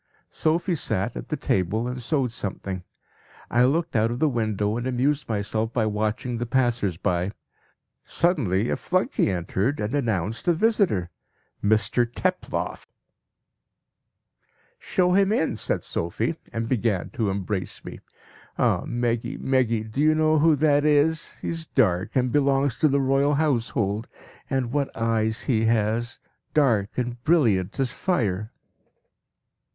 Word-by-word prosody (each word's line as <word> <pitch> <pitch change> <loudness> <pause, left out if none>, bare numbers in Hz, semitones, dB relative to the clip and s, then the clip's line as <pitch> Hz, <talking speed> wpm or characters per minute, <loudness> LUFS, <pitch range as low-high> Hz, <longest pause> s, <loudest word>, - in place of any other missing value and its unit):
"Sophie 170 +3 0
sat 110 - -1
at - - -7
the 150 - -1
table 105 0 0
and 125 0 -4
sewed 135 -1 0
something. 95 -4 -4 0.7
I 120 +1 +4
looked 160 +3 0
out 110 0 +3
of 120 - -3
the 155 - +2
window 110 -5 0
and 120 +2 -2
amused 135 +3 0
myself 110 +1 -1
by 115 -3 +1
watching 110 +3 -1
the 120 +1 -3
passers 120 -8 +1
by. 90 +3 -1 0.7
Suddenly 120 - +1
a - - +1
flunkey 185 - 0
entered 95 - -1
and 105 +2 -2
announced 115 - -1
a 175 - +5
visitor 170 - +1 0.5
'Mr 110 +3 +2
Teploff.' 185 +7 -2 1.9
"'Show 180 -2 +1
him 195 +1 +4
in!' 160 - +1
said - - -2
Sophie, 110 - -2 0.2
and 115 0 -3
began 115 -6 0
to 115 -7 -1
embrace 95 0 -3
me. - - -8 0.6
'Ah! - - +2
Meggy, 120 -1 -1
Meggy, 125 -4 +1
do 110 +6 -3
you 155 +1 +4
know 155 0 +3
who 160 0 +5
that 145 0 +3
is? 150 +1 +2
He - - -3
is 165 -1 -4
dark, 95 -6 +1
and 125 -1 +2
belongs 140 -2 +2
to 155 - +4
the 140 -1 +2
Royal 135 +2 +2
Household; 115 -7 0 0.4
and 130 -3 -1
what 140 0 0
eyes 110 -1 0
he 115 -4 +1
has! 115 +1 0 0.4
Dark 115 -9 +3
and 120 -1 -3
brilliant 115 - +2
as 130 -2 0
fire.' 110 - -1
120 Hz, 140 wpm, -25 LUFS, 110-145 Hz, 1.9 s, a